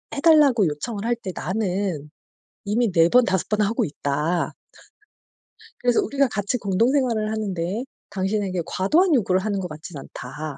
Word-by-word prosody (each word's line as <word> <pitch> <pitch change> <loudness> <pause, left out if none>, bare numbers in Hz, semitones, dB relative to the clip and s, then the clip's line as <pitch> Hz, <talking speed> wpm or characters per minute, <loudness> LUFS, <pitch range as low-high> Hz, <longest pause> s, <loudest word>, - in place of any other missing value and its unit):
해 280 - -3
달라고 285 - +5
요청을 200 +8 -4
할 240 +1 +1
때 195 -5 -6
나는 185 -6 -2 0.6
이미 220 +2 +1
4 165 -1 +4
번 250 +3 +5
5 190 -2 0
번 210 0 +1
하고 210 +2 +1
있다" 150 +4 -1 1.3
"그래서 245 -1 +3
우리가 280 -1 +1
같이 205 +1 -2
공동생활을 225 +2 +1
하는 215 -3 -2
데에 180 +7 -2 0.3
당신에게 190 -1 -1
과도한 320 - +2
요구를 190 -6 +2
하는 200 0 -1
것 185 - -3
같진 155 0 -9
않다." 140 +2 -7
200 Hz, 300 characters per minute, -23 LUFS, 180-235 Hz, 1.3 s, 달라고